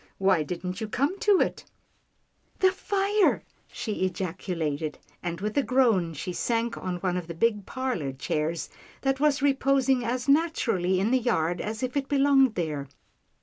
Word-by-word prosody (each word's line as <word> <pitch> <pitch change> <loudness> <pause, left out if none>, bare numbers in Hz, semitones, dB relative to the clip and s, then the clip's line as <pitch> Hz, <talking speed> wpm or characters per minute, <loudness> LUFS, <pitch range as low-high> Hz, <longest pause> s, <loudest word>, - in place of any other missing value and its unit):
Why 190 -4 +3
didn't 180 +6 -4
you 220 - -2
come 280 - -1
to 410 -3 +4
it? - - 0 0.3
" - - -44
" - - -40
The 375 0 +5
fire! 400 +1 +1
" - - -37
she 210 -4 -4
ejaculated, 165 -5 -3 0.2
and 170 -1 -4
with 210 +2 -3
a - - +4
groan, 230 - +2
she 180 +5 -4
sank 230 +3 -1
on 180 -1 -4
one 180 -2 0
of 175 -2 -5
the 170 - -6
big 210 +1 +1
parlour 255 - -2
chairs 150 +5 -2 0.3
that 270 -1 0
was 295 -1 +2
reposing 270 -2 +2
as 245 +2 -2
naturally 245 - +2
in 205 +5 +1
the 260 - +4
yard 175 -8 0
as 220 +3 -4
if 255 +1 -2
it 275 -1 -1
belonged 275 -3 +4
there. 150 -5 -2
220 Hz, 175 wpm, -27 LUFS, 175-270 Hz, 0.3 s, The